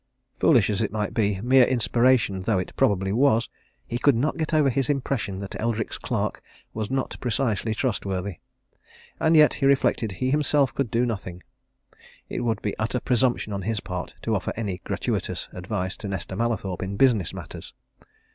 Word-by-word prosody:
Foolish 120 -9 +4
as 105 +1 -1
it 105 -3 -1
might 105 -1 -2
be, 105 -4 +1
mere 130 +2 +6
inspiration 120 -4 +2
though 105 +1 +1
it 90 - -4
probably 95 -1 +2
was, 120 -1 +3 0.4
he 120 - -3
could 140 0 +4
not 140 +7 0
get 160 -1 -2
over 155 -3 +4
his 135 +2 0
impression 135 -8 -1
that 100 +1 -6
Eldrick's 115 -1 -2
clerk - - -2 0.3
was 110 -1 -3
not 135 0 -2
precisely 115 -2 0
trustworthy. 100 - -2 0.8
And 160 0 +4
yet, 150 -1 +7
he 135 - +1
reflected, 125 -6 +2
he 130 +7 -1
himself 145 -2 +2
could 140 -4 -1
do 120 +3 +1
nothing 95 -6 -5 0.9
it - - -3
would 115 -3 -1
be 105 - -2
utter 115 +3 -1
presumption 120 -4 +1
on 100 - -3
his 110 +3 -1
part 90 -3 -6
to 115 - 0
offer 100 - -1
any 100 -6 -3
gratuitous - - -2
advice 95 +1 -3
to 105 - -6
Nesta 95 -1 -4
Mallathorpe 105 -5 -2
in 95 +1 -4
business 115 - +3
matters. - - -9
115 Hz, 175 wpm, -25 LUFS, 100-130 Hz, 0.9 s, yet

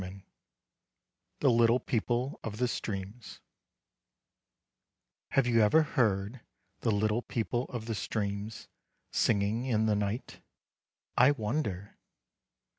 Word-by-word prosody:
X 90 +1 -7 1.3
The 135 - +5
Little 115 +1 +4
People 120 +2 -1
of 105 -2 -5
the 125 +2 +1
Streams 105 0 -5 1.9
HAVE 135 - +4
you 115 -2 +4
ever 155 +10 +5
heard 110 -4 0 0.4
the 115 - 0
Little 110 +2 +1
People 120 +1 -2
of 120 -5 -6
the 115 - -2
Streams 105 0 -3 0.4
singing 110 +2 +1
in 110 -3 +2
the 110 -1 +2
night? 105 +3 -3 0.7
I 130 - +6
wonder! 105 -6 -2
110 Hz, 110 wpm, -30 LUFS, 105-120 Hz, 1.9 s, I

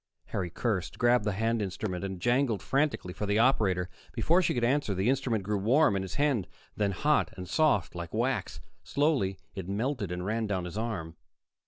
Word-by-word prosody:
Harry 90 -2 -2
cursed, 95 0 -2
grabbed 120 -2 +3
the 105 - +1
hand 115 +3 0
instrument, 95 -1 -3
and 95 -2 -4
jangled 120 -2 +1
frantically 135 -10 0
for 105 - -4
the 100 +1 +2
operator. 105 -7 +3 0.3
Before 175 +3 +3
she 165 - +1
could 120 - 0
answer, 125 -4 +1
the 95 +7 +2
instrument 125 -6 0
grew 105 +1 -1
warm 120 +3 +4
in 95 - 0
his 95 -1 -5
hand, 140 -10 +1 0.3
then 105 -1 +1
hot 95 - +1
and 90 -1 -6
soft, 105 - +2
like 85 -2 -6
wax. - - -1 0.2
Slowly, 140 -10 +1 0.2
it 95 -2 -6
melted 110 - -1
and 90 0 -3
ran 110 +2 -1
down 95 -3 -1
his 90 - -7
arm. 100 -8 -4
105 Hz, 190 wpm, -29 LUFS, 95-125 Hz, 0.3 s, warm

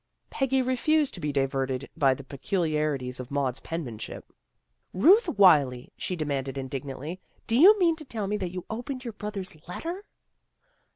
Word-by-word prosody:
Peggy 265 -1 +1
refused 280 +3 +2
to - - -6
be 150 -2 -2
diverted 135 -1 -1
by 135 -4 +3
the 140 - -10
peculiari 150 0 -1
ties 125 0 -5
of 125 -1 -7
Maud's 135 -3 -1
penmanship. 130 -10 -6 0.3
" - - -53 0.3
Ruth 360 - +6
Wylie! 145 - +4
" - - -51
she 185 - -3
demanded 140 -4 -3
indignantly. 135 +6 -5
" - - -37
Do 230 - 0
you 380 - +8
mean 340 -4 +3
to 310 - -9
tell 225 -6 -4
me 210 +2 -1
that 185 -3 -3
you 180 -1 -6
opened 250 +4 -5
your 235 - -4
brother's 205 -4 -5
let 180 - -6
ter? 350 +5 -4
170 Hz, 180 wpm, -27 LUFS, -, 0.3 s, you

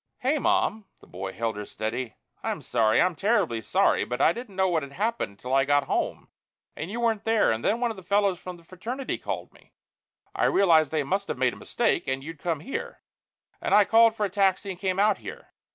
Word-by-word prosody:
"Hey, 280 +4 0
Mom!" 350 - +1
The - - -18
boy 95 +2 -6
held 115 +1 -3
her 105 - -5
steady. 115 +2 -4 0.3
"I'm - - -3
sorry. 110 -2 +2
I'm 180 0 +3
terribly 195 - +1
sorry. - - +2
But 125 +1 -4
I 160 - +4
didn't 235 -3 -9
know 190 0 +2
what 170 -3 +1
had 140 -1 -8
happened 215 - -2
until 125 +6 -6
I 135 0 +5
got 145 +1 +3
home 135 - -2 0.5
and 160 - -5
you 225 +4 -4
weren't 225 -3 0
there 225 - +3
and 110 +1 -2
then 225 - +1
one 240 -1 0
of 220 - -9
the - - -9
fellows 200 0 +1
from 180 -1 -8
the 170 - -19
fraternity 235 +10 -5
called - - -5
me. - - -23 0.6
I - - +1
realized 160 -6 +4
they 155 -2 0
must 195 +7 -1
have - - -3
made 125 -1 +2
a - - -9
mistake, - - -1
and 135 +1 -2
you'd 160 +1 -8
come 165 -3 -2
here, 270 - -6 0.6
and - - +2
I 210 -1 +6
called 225 +1 +5
for 210 - 0
a - - -2
taxi 195 0 +1
and 180 - -9
came 185 -1 -1
out 205 0 +3
here. 485 +1 -9
185 Hz, 230 wpm, -26 LUFS, 135-220 Hz, 0.6 s, I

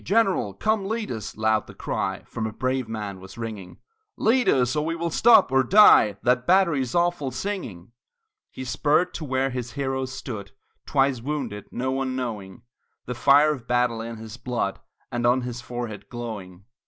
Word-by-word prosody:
"General, 190 - +1
come 215 - 0
lead 220 0 -3
us!" 110 -3 -6
loud 110 0 +1
the - - -12
cry - - -3
From 110 -1 -4
a - - -5
brave 130 0 -2
band 105 -4 -5
was 95 +3 -12
ringing 110 -5 -7 0.4
"Lead 230 -1 +3
us, 125 0 +2
and 150 - +1
we 165 +1 -2
will 170 0 -3
stop, 230 - +6
or 135 0 +4
die, 130 - +6
That 125 0 +2
battery's 170 -9 +3
awful 175 -5 +1
singing!" 125 - -5 0.6
He 130 - -8
spurred 150 +6 +1
to - - -5
where 135 -1 0
his 125 -2 -5
heroes 130 -1 -2
stood 110 -5 -7 0.3
Twice 135 -4 +2
wounded, 125 -7 -4
no 130 +2 -2
one 130 -1 -2
knowing 105 -7 -5 0.4
The 125 - -4
fire 145 +4 +5
of 125 -5 -10
battle 120 -2 +1
in 115 0 -6
his 110 +1 -9
blood 120 -6 -2 0.3
And 120 0 0
on 125 +2 +3
his 125 0 -5
forehead 120 -4 -6
glowing. 100 -6 -7
125 Hz, 175 wpm, -24 LUFS, 110-145 Hz, 0.6 s, stop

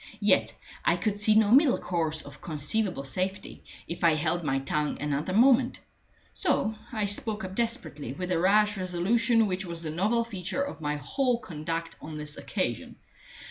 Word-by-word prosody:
Yet - - +3 0.3
I - - +3
could 205 -3 -1
see 215 +1 +4
no 215 -1 +4
middle 270 +1 +6
course 160 -3 -2
of 145 0 -13
conceivable 165 +2 -1
safety, 185 +8 -4 0.2
if 170 +1 -6
I 165 -2 +5
held 165 +3 0
my 135 -3 0
tongue 150 +2 -1
another 150 +3 -2
moment. 245 +4 +4 0.5
So 220 - +1 0.2
I 215 -4 -1
spoke 210 +1 -1
up 185 0 -5
desperately, 230 - -2
with 180 +7 -5
the 175 -2 +1
rash 210 +3 +3
resolution 220 +6 +2
which 190 -1 -2
was 170 -2 -3
the 155 - -3
novel 210 +8 +1
feature 205 +3 -3
of 280 - -6
my 150 -1 -1
whole 245 - 0
conduct 165 -4 -5
on 155 0 -7
this 150 0 -4
occasion. 120 - -3
185 Hz, 170 wpm, -28 LUFS, 155-220 Hz, 0.5 s, middle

